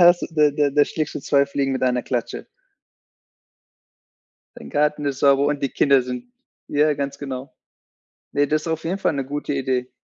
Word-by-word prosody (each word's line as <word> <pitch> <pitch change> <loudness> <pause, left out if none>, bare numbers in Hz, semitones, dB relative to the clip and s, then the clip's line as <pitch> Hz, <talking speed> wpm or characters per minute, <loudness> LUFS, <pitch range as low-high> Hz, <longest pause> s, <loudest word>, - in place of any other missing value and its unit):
Das 175 0 +7
da 150 -2 +4
da 145 0 +1
da 145 +1 +4
schlägst 155 -2 -3
du - - -4
zwei 140 0 +3
Fliegen 140 -1 -1
mit 130 - -3
einer 125 -1 +1
Klatsche. 120 -3 -3 2.1
Dein 70 - -11
Garten 150 0 +1
ist 140 -2 -2
sauber 140 +1 +4
und 145 -1 -1
die 140 - +1
Kinder 140 0 +3
sind 125 - -7 0.4
ja, 150 +1 +2
ganz 140 0 -4
genau. 135 -1 -6 0.8
Ne, 145 0 +2
das 155 0 0
ist - - -6
auf 160 -1 -2
jeden 185 +4 -2
Fall - - +1
'ne 135 -2 -2
gute 145 +1 -3
Idee. 130 -2 -1
140 Hz, 185 wpm, -22 LUFS, 135-150 Hz, 2.1 s, Das